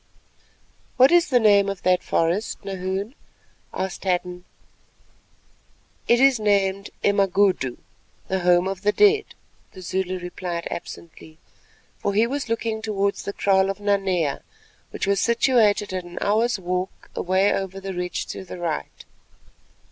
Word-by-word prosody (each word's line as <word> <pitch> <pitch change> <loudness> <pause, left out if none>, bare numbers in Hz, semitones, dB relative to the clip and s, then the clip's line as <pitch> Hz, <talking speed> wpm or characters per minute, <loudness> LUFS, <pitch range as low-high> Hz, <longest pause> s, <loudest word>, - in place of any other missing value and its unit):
"What 260 +3 +6
is 345 -1 +4
the 250 -3 +4
name 200 -3 +4
of 195 -2 -6
that 180 -1 +3
forest, 180 +5 -1
Nahoon?" 195 +3 -4 0.6
asked 190 0 -4
Hadden. 180 -1 -2 1.6
"It 240 - +4
is 270 -2 +5
named 200 -1 +1
Emagudu, 195 - +2 0.5
The 190 - -1
Home 175 0 +3
of 195 -1 -4
the 210 +1 +2
Dead," 420 - +4 0.5
the 185 - -11
Zulu 185 +1 -2
replied 175 -1 -5
absently, 160 -2 -9 0.6
for 200 - -2
he 220 +2 +4
was 270 0 -4
looking 225 -1 -2
towards 200 -2 -1
the 200 - -5
kraal 195 -1 +2
of 195 0 -4
Nanea, 195 -7 0 0.5
which - - -4
was 200 -1 +1
situated 230 -4 +2
at 185 -1 -3
an 175 0 -12
hour's 220 +3 +1
walk 185 0 -4
away 190 +2 +2
over 195 0 -4
the 195 0 -6
ridge 180 0 -3
to - - -6
the 180 - -9
right. 170 -3 -5
195 Hz, 140 wpm, -23 LUFS, 180-210 Hz, 1.6 s, What